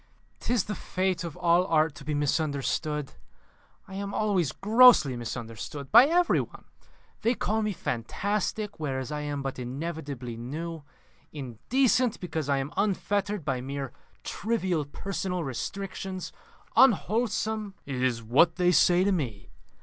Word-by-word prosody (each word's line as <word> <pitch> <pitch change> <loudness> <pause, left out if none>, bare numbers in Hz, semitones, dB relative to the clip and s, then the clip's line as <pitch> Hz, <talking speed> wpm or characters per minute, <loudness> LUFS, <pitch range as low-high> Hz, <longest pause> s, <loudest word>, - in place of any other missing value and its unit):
"'Tis 240 -6 +1
the 210 - -4
fate 185 -3 -1
of 170 -1 -6
all 175 0 +4
art 160 -2 +3
to 145 - -11
be 150 +1 -2
misunderstood. 150 0 -1 0.8
I 190 - -11
am 200 +1 -4
always 195 -8 +1
grossly 215 - +6
misunderstood 120 +3 -6
by 260 - +9
every 350 +2 +3
one. - - -10 0.6
They 235 +3 +2
call 220 0 0
me 215 -1 0
fantastic, 200 - -2
whereas 135 -2 -3
I 150 - -2
am 145 -1 -3
but 135 -1 -4
inevitably 135 -2 -5
new; 160 +7 -5 0.5
indecent, 225 - +1
because 160 -5 -4
I 140 - +3
am 135 +2 -3
unfettered 200 -2 0
by 130 -3 -1
mere 135 0 -5 0.3
trivial 190 -8 -1
personal 180 +3 -3
restrictions; 185 +7 -5 0.4
unwholesome." 220 -3 +2
"It 130 -3 -4
is 120 -3 0
what 145 +9 +4
they 180 -1 +3
say 180 +1 +5
to 200 - +2
me. 125 - -3
170 Hz, 135 wpm, -28 LUFS, 140-200 Hz, 0.8 s, by